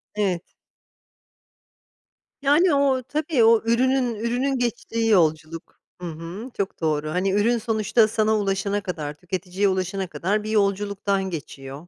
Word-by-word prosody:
Evet. 190 -5 0 2.0
Yani, 300 +4 +4
o, 270 -2 +2
tabii 295 -2 0
o 225 0 +5
ürünün 250 0 +2
ürünün 245 +5 -1
geçtiği 230 -1 -2
yolculuk. 160 -4 0 0.2
Hı 175 - -4
hı, 170 +9 -7
çok 195 -3 -3
doğru. 155 -1 0
Hani, 185 +4 0
ürün 220 +4 +2
sonuçta 220 0 +2
sana 220 -1 +1
ulaşana 200 0 -1
kadar, 155 -6 -5
tüketiciye 185 +4 -2
ulaşana 190 0 -2
kadar 205 +5 -1
bir 215 - -5
yolculuktan 200 -2 0
geçiyor. 145 -1 -8
205 Hz, 125 wpm, -23 LUFS, 180-235 Hz, 2.0 s, o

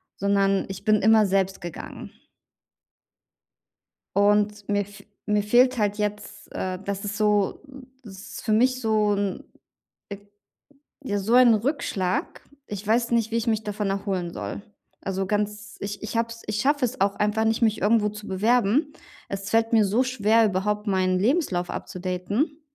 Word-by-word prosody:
sondern 195 0 +1
ich 195 +2 -8
bin 215 -1 +3
immer 220 +1 +5
selbst 195 0 0
gegangen. 175 -3 -8 2.1
Und 205 0 +2
mir 205 0 +1
f 205 0 -13 0.2
mir 210 -1 +2
fehlt 245 +5 +4
halt 205 -2 0
jetzt, 210 0 -4
äh, 185 -1 -3
dass 200 0 -4
es 205 +1 -4
so 210 -2 +1 0.4
es 195 -2 -10
ist - - -9
für 220 - 0
mich 255 +3 +3
so 215 -2 +2
'n 200 -1 -2 0.7
äh, 200 - -6 0.9
ja 205 -6 -1
so 220 +5 -1
ein 250 -2 +7
Rückschlag. 210 - -2 0.3
Ich 205 0 -6
weiß 235 +2 +1
nicht, 230 -1 +1
wie 230 - +1
ich 230 - -2
mich 220 -1 +1
davon 210 -1 -3
erholen 195 -3 -2
soll. - - -5 0.4
Also 195 0 -2
ganz 210 +1 -3
ich 205 +1 -6
ich 215 - -5
habe 230 0 +1
es 230 0 -10
ich 210 0 -1
schaffe 285 -1 +2
es 250 +2 -6
auch 200 0 +2
einfach 210 +1 0
nicht, 225 +1 +1
mich 220 -1 +1
irgendwo 210 0 +3
zu 210 0 -10
bewerben. 235 - +2 0.4
Es 195 0 -5
fällt 225 +1 +2
mir 220 -2 +5
so 215 +6 +2
schwer, 225 -3 +3
überhaupt 210 +1 -1
meinen 185 -2 +1
Lebenslauf 205 - 0
upzudaten. 195 - -3
210 Hz, 165 wpm, -25 LUFS, 195-225 Hz, 2.1 s, ein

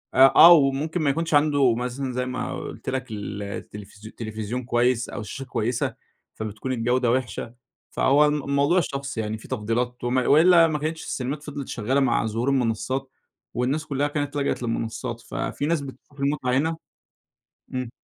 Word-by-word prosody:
أ - - -2 0.2
آه 175 +1 +10
وممكن 150 +3 +2
ما 145 - +2
يكونش 165 +3 -1
عنده 145 -4 +4
مثلًا 125 +2 -3
زي 125 +1 -1
ما 125 0 -4
قلت - - -6
لك 130 -2 -3
ال 105 -1 -5
التلفزيو 105 +1 -9
تلفزيون 110 +2 -4
كويّس 120 0 +1
أو 105 - -5
شاشة 135 +5 -7
كويّسة، 120 -1 -1 0.4
فبتكون 110 +4 -5
الجودة 120 +1 +1
وحشة، 125 -2 -2 0.4
فهو 145 +3 +4
الم 150 -1 0
الموضوع 140 +6 +2
شخصي 140 -5 -4
يعني، 110 0 -3
في - - -13
تفضيلات 120 +1 -2
وم 120 +1 0
وإلا 165 +6 +6
ما 155 -2 -2
كانتش 160 +2 -3
السينمات 140 +3 -4
فضلت 145 -2 -6
شغّالة 125 +5 0
مع 120 -5 +2
ظهور 115 +4 -1
المنصات، 130 +1 -1 0.4
والناس 135 +6 -1
كلّها 145 +1 0
كانت 145 -1 -3
لجأت 140 -2 -1
للمنصات، 115 0 -3
ففي 135 +2 -4
ناس 160 -1 +1
بتشوف 140 +1 -12
المتعة 140 -2 0
هنا 160 +3 0 1.0
إمم. 130 -2 -3
130 Hz, 165 wpm, -24 LUFS, 115-145 Hz, 1.0 s, آه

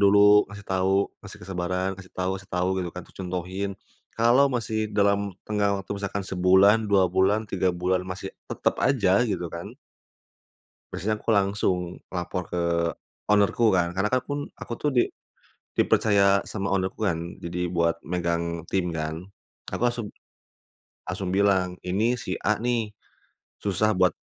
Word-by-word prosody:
dulu, 105 +1 +7
ngasih 105 0 -10
tahu, 95 +1 +2 0.2
ngasih - - -10
kesabaran, 90 0 -2
kasih 95 -1 -13
tahu 90 0 -1
kasih 95 - -17
tahu 90 +1 +1
gitu 90 - -3
kan, 90 - -5
terus - - -21
contohin. 90 +2 -3 0.4
Kalau 125 +4 +4
masih 110 -3 -2
dalam 100 -1 +2 0.2
tenggang 100 -2 +1
waktu, 95 - -15
misalkan 100 0 -3
sebulan, 95 +3 +4
2 100 -3 +3
bulan, 100 +4 +2
3 95 -2 +1
bulan, 90 +1 0
masih 95 +1 -5 0.2
tetap - - 0
aja, - - +3
gitu - - -2
kan - - -7 1.2
biasanya 110 +4 -1
aku - - -2
langsung, 100 -2 +2 0.4
lapor 90 0 -3
ke 90 - -2 0.6
owner 105 -1 +4
ku 115 -4 +3
kan, 85 -1 +2
karena 95 +3 0
kan 130 +3 +1
akun 145 +1 -3
aku - - -8
tuh 150 - 0
di 120 - +5 0.7
dipercaya 100 -2 +4
sama 100 -2 -2
owner 95 -1 +1
ku 110 - -5
kan, 85 -3 -2
jadi 90 +1 -3
buat 85 -1 +1
megang 85 -1 -2
tim 95 -2 +1
kan. 80 0 -3 0.5
Aku - - -4
langsung 120 -2 0 1.0
langsung 95 0 -3
bilang, 95 -2 +2
ini 110 +7 +1
si 95 - -3
A 105 +1 +2
nih, 115 -2 -1 0.7
susah 105 +2 +1
buat 90 -1 +4
95 Hz, 155 wpm, -26 LUFS, 90-105 Hz, 1.2 s, dulu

